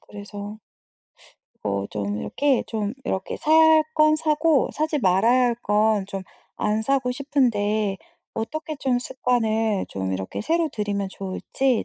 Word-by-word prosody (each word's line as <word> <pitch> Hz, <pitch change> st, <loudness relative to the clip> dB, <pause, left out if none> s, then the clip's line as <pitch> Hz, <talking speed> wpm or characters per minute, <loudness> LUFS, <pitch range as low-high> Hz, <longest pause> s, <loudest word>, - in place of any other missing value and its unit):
그래서 205 Hz, +1 st, -9 dB, 1.0 s
어 100 Hz, -1 st, -1 dB
좀 105 Hz, 0 st, -3 dB
이렇게 280 Hz, -3 st, +1 dB
좀 215 Hz, -2 st, -2 dB
이렇게 190 Hz, -5 st, -3 dB
사야 315 Hz, +1 st, +3 dB
할 320 Hz, -1 st, +7 dB
건 310 Hz, 0 st, +5 dB
사고 310 Hz, -1 st, +2 dB
사지 310 Hz, -1 st, -1 dB
말아야 225 Hz, +5 st, +4 dB
할 235 Hz, -, 0 dB
건 210 Hz, -1 st, +2 dB
좀 195 Hz, -1 st, -5 dB, 0.3 s
안 215 Hz, +1 st, 0 dB
사고 265 Hz, 0 st, +1 dB
싶은데 215 Hz, -7 st, 0 dB, 0.4 s
어떻게 310 Hz, +7 st, -4 dB
좀 255 Hz, -3 st, 0 dB
습관을 225 Hz, -5 st, 0 dB
좀 95 Hz, -1 st, -3 dB
이렇게 95 Hz, 0 st, -4 dB
새로 330 Hz, +6 st, +1 dB
들이면 205 Hz, -2 st, -2 dB
좋을지 225 Hz, +7 st, -1 dB
220 Hz, 260 characters per minute, -24 LUFS, 200-280 Hz, 1.0 s, 할